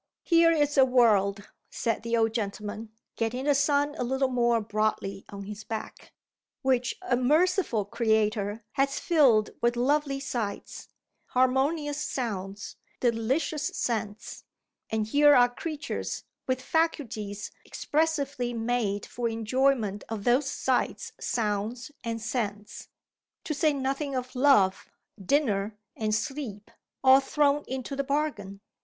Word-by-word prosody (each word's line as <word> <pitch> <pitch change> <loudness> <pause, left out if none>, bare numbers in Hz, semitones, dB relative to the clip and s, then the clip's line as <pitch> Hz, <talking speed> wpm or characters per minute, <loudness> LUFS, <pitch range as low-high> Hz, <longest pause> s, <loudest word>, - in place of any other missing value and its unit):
"Here 335 -1 +5
is 290 -3 +2
a - - +9
world," 210 -6 +3 0.2
said 230 -2 -2
the 230 +1 0
old 225 -1 +2
gentleman, 210 0 -4 0.3
getting 240 +4 -2
the 290 - +4
sun 285 +1 +2
a - - +1
little 265 +2 0
more 240 -2 +2
broadly 210 -2 -2
on 200 0 -7
his 210 +1 -8
back, 220 0 -7 0.5
"which 255 -1 +1
a 370 - +1
merciful 300 - +2
Creator 215 -1 0
has 275 +1 0
filled 260 -11 +4
with 240 0 +2
lovely 275 +2 +1
sights, 235 -7 -4 0.4
harmonious 285 +4 +1
sounds, 205 -7 -4 0.2
delicious 255 +6 0
scents; 220 -3 -3 0.5
and 220 -1 0
here 290 +5 +5
are 245 -1 +6
creatures 295 0 -4 0.2
with 255 0 -1
faculties 230 -12 -1
expressly 280 -6 -1
made 225 -3 -1
for 235 -1 -3
enjoyment 225 -2 0
of 220 -3 -4
those 255 +4 +2
sights, 260 -1 -1
sounds, 225 +4 -2
and 230 -1 -3
scents 210 -3 -4 0.6
to 305 - -2
say 305 +1 +2
nothing 275 0 -2
of 255 0 -4
Love, 250 -8 +3 0.3
Dinner, 210 -4 +1 0.2
and 215 -1 0
Sleep, 220 -4 -5 0.3
all 265 0 +8
thrown 285 +1 +1
into 260 +1 -4
the 275 - -1
bargain. 275 -9 -2
245 Hz, 125 wpm, -27 LUFS, 215-280 Hz, 0.6 s, a